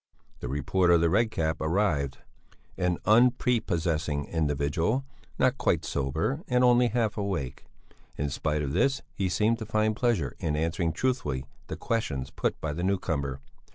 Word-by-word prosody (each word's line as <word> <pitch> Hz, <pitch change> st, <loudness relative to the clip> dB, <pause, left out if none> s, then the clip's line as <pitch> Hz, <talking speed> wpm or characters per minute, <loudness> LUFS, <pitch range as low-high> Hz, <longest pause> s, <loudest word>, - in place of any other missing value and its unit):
The -, -, -5 dB
reporter 85 Hz, +6 st, +2 dB
of 85 Hz, -, +4 dB
the 85 Hz, -1 st, +3 dB
Red 110 Hz, +4 st, +3 dB
Cap 80 Hz, -6 st, -1 dB
arrived, 80 Hz, -5 st, 0 dB, 0.6 s
an 90 Hz, -1 st, 0 dB
unprepossessing 90 Hz, -, +2 dB
individual, 80 Hz, -, 0 dB, 0.3 s
not -, -, +2 dB
quite -, -, +1 dB
sober 80 Hz, -, -1 dB
and 125 Hz, 0 st, +2 dB
only 125 Hz, 0 st, +5 dB
half 115 Hz, -2 st, 0 dB
awake. 85 Hz, -10 st, -3 dB, 0.5 s
In 70 Hz, 0 st, -2 dB
spite 75 Hz, 0 st, -1 dB
of 70 Hz, -1 st, -3 dB
this 135 Hz, -, +1 dB
he 95 Hz, -2 st, -1 dB
seemed 110 Hz, +5 st, +1 dB
to 110 Hz, -, -5 dB
find 110 Hz, 0 st, +1 dB
pleasure 110 Hz, -, 0 dB
in 75 Hz, -2 st, -1 dB
answering 80 Hz, +2 st, 0 dB
truthfully 80 Hz, -, -1 dB, 0.2 s
the -, -, -5 dB
questions 70 Hz, -, -2 dB
put -, -, -2 dB
by 75 Hz, -2 st, -3 dB
the 85 Hz, -, -4 dB
newcomer. 80 Hz, -8 st, -1 dB
85 Hz, 155 wpm, -28 LUFS, 75-110 Hz, 0.6 s, only